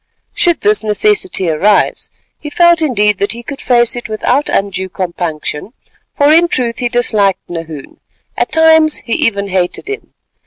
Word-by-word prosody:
Should 345 -3 +1
this 210 +1 +2
necessity 370 - 0
arise, 200 +7 +1 0.3
he 295 - -7
felt 345 +2 +3
indeed 210 -9 +1
that 200 - 0
he 235 +1 -9
could 275 +3 -8
face 240 -1 +2
it 240 -2 -7
without 245 +6 -1
undue 190 -1 -2
compunction, 175 0 -5 0.4
for 290 +1 +3
in 340 +2 +4
truth 240 -7 -2
he 245 -1 -1
disliked 215 -5 0
Nahoon; 165 -4 -8 0.4
at - - -2
times 320 -1 +4
he 230 - -3
even 200 -3 -1
hated 185 - -2
him. 415 +1 -7
230 Hz, 155 wpm, -13 LUFS, 195-295 Hz, 0.4 s, in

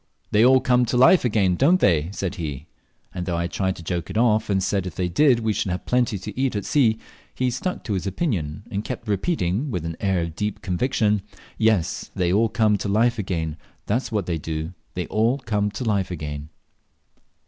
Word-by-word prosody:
"They 110 0 +4
all 130 +1 +6
come 125 0 +3
to 125 - 0
life 130 +8 +6
again, 105 -6 +2
don't 165 - +4
they?" 85 - +3
said 95 -2 -3
he; 75 -5 -5 0.5
and 90 0 -5
though 85 -2 0
I 85 - -1
tried 95 +2 -1
to 85 - -10
joke 85 -1 -3
it - - -3
off, 110 -2 +3
and 95 -2 +1
said 95 -1 0
if 85 - -7
they 90 0 -1
did 120 - +3
we 110 -1 +1
should 100 - -1
have 90 +1 -3
plenty 125 -4 +1
to 100 +2 -8
eat 130 -2 0
at 100 - -2
sea, 115 -7 +3 0.4
he 130 -1 0
stuck 180 +10 -3
to 105 - -3
his 95 0 -2
opinion, 95 - -2
and 100 +1 -2
kept 120 -1 -6
repeating, 105 - 0
with 90 -9 -3
an 85 0 -4
air 95 -4 +1
of 85 -1 -5
deep 105 +1 -3
conviction, 105 +1 +1 0.4
"Yes, 110 -6 +1
they 90 -1 +1
all 110 +3 +3
come 105 -2 +2
to 100 - -3
life 115 +3 +2
again, 80 -5 -2 0.3
that's 120 +5 -1
what 105 -4 -1
they 85 -2 -2
do 80 +2 -4 0.2
they 90 -1 -2
all 115 - +1
come 105 -6 -1
to 105 +5 -5
life 100 -5 0
again." 75 -3 -5
100 Hz, 215 wpm, -23 LUFS, 90-115 Hz, 0.5 s, all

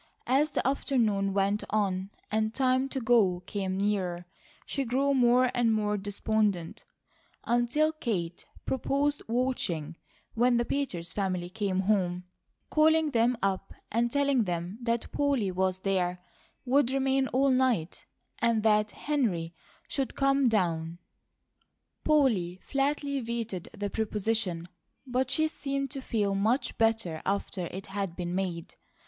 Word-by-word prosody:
As 275 +4 +3
the 270 - -1
afternoon 225 -8 +1
went 200 +1 +1
on 195 -2 0 0.2
and 220 +1 0
time 260 0 +2
to 270 - -3
go 215 -7 +3
came 190 -2 -3
nearer, 190 -4 -1 0.4
she 275 - -2
grew 270 +3 +1
more 250 -1 +4
and 240 -2 +2
more 210 -1 +1
despondent, 205 -2 -1 0.6
until 240 +6 +2
Kate 195 - -3 0.2
proposed 280 +2 0
watching 220 - -1 0.4
when 240 +1 +3
the 235 - +1
Peters 180 -14 -2
family 185 -3 -2
came 195 -3 -1
home, 185 -3 +1 0.5
calling 315 0 +4
them 240 0 +2
up, 195 0 -1 0.2
and 235 +2 +1
telling 280 -3 +2
them 175 +3 -3
that 235 -1 -1
Polly 275 -9 +1
was 185 0 0
there, 180 -2 0 0.5
would 265 0 +3
remain 270 0 +1
all 270 +2 +2
night, 250 -10 0 0.3
and 230 -2 +2
that 210 -1 +3
Henry 205 - -1 0.3
should 270 -2 -2
come 275 -2 +3
down. 170 -5 0 1.1
Polly 230 - +2
flatly 280 0 0
vetoed 230 -6 -4
the 205 -1 -4
proposition, 210 -5 -1 0.4
but 255 0 0
she 315 +4 +3
seemed 275 -3 -3
to 275 -2 -5
feel 210 -6 0
much 225 +7 +1
better 225 -8 +1
after 195 -2 -2
it 190 +3 -7
had 195 -3 -4
been 175 -1 -4
made. 180 -3 -3
220 Hz, 130 wpm, -29 LUFS, 190-260 Hz, 1.1 s, more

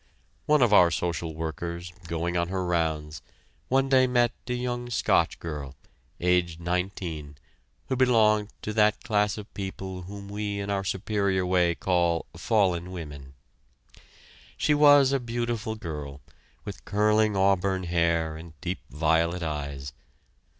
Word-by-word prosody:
One 150 -3 +5
of 115 -3 +3
our 90 -4 +7
social 85 -2 -2
workers, 85 +2 -5
going 85 +1 -2
on 85 0 +1
her 95 0 -2
rounds, 80 -3 -1 0.5
one 135 +1 +2
day 130 -1 +5
met 120 -1 +3 0.2
a 125 - -1
young 120 0 -3
Scotch 120 - +2
girl, 75 -4 -6 0.4
aged 90 -2 +1
nineteen, 85 -4 -3 0.5
who 130 - 0
belonged 110 -5 +3
to 105 - -3
that 105 -1 +3
class 105 -3 +1
of 105 0 -9
people 95 -1 -5
whom 100 +2 -9
we 100 0 -3
in 100 0 -3
our 100 -1 0
superior 95 0 0
way 90 -2 +2
call 85 -2 +1
"fallen 90 -2 +1
women." 70 -6 -8 1.2
She 150 - +2
was 145 -2 +6
a 135 - +2
beautiful 120 -2 -3
girl, 75 -8 -7 0.4
with - - -8
curling 105 0 +2
auburn 95 -1 +2
hair 85 -2 +1
and 80 -1 -12
deep 90 +3 -3
violet 85 +5 +1
eyes. 70 -3 -4
90 Hz, 135 wpm, -27 LUFS, 85-105 Hz, 1.2 s, our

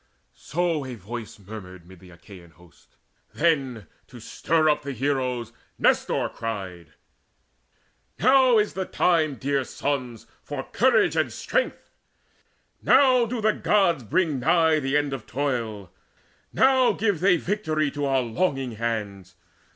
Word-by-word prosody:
So 170 -3 -2
a 130 -2 -7
voice 110 +2 -8
murmured 95 -4 -11
mid 95 -1 -15
the 90 +1 -16
Achaean 85 0 -15
host. 85 -2 -23 0.4
Then, 135 - 0 0.2
to - - -13
stir 160 -1 0
up 150 - +2
the 140 0 -5
heroes, 125 -3 -2 0.2
Nestor - - +1
cried: 95 -8 -7 1.2
"Now 260 0 +5
is 210 0 +1
the 190 0 -3
time, 160 -7 +1
dear 140 +2 -1
sons, 125 -5 -4 0.2
for 145 -2 -6
courage 260 - +2
and - - 0
strength: - - -3 0.9
Now 255 -3 +4
do 235 0 -4
the 215 0 +2
Gods 175 -9 +1
bring 150 - 0
nigh 160 +3 +3
the 135 0 0
end 145 -2 -1
of 130 -5 -7
toil: 115 -8 -3 0.6
Now 260 -1 +4
give 205 -5 0
they 180 0 +4
victory 160 -6 -1
to 145 0 -3
our 135 -1 +1
longing 135 0 -1
hands. 100 -5 -4
135 Hz, 135 wpm, -24 LUFS, 110-175 Hz, 1.2 s, Now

